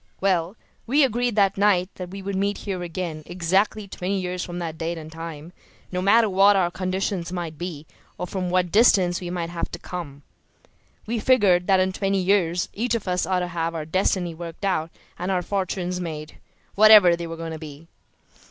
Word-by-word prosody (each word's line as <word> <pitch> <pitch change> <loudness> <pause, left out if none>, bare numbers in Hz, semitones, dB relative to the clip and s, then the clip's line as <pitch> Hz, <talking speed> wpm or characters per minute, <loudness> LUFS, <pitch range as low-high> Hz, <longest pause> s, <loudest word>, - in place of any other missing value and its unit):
Well, 185 -1 +1 0.3
we 285 +5 +4
agreed 245 -2 0
that 195 -2 +2
night 195 -3 +3
that 180 -1 -7
we 195 +1 -8
would 200 0 -3
meet 200 +1 0
here 190 -3 -3
again 170 -2 -4
exactly 190 +4 0
twenty 190 +1 -3
years 180 -1 -3
from 175 0 -6
that 165 -2 -4
date 165 +1 -2
and 155 -1 -9
time, 165 0 -8 0.4
no 180 0 -2
matter 220 +4 +5
what 200 +1 +5
our 180 -3 +2
conditions 185 -1 -2
might 170 -3 -4
be 160 -2 -6 0.3
or - - -3
from 180 0 -3
what 180 -1 +1
distance 190 -6 +4
we 175 - -5
might 170 -1 -3
have 170 -1 -3
to - - -4
come. 160 -6 -7 0.8
We 230 +1 -2
figured 205 -7 +3
that 190 -2 +4
in 185 0 +2
twenty 195 0 0
years 180 -2 +1
each 235 +3 -1
of 220 -4 -4
us 180 -2 0
ought 185 -1 +1
to 180 - -2
have 165 -1 -2
our 155 -2 -4
destiny 180 0 0
worked 170 +3 -7
out 165 -4 0 0.3
and 180 +2 -3
our 185 -2 0
fortunes 185 -2 -2
made, 155 -3 -6 0.4
whatever 210 -4 +8
they 170 0 -6
were 165 0 -7
going 165 0 -5
to 160 - -7
be." 150 0 -10
180 Hz, 200 wpm, -24 LUFS, 170-195 Hz, 0.8 s, whatever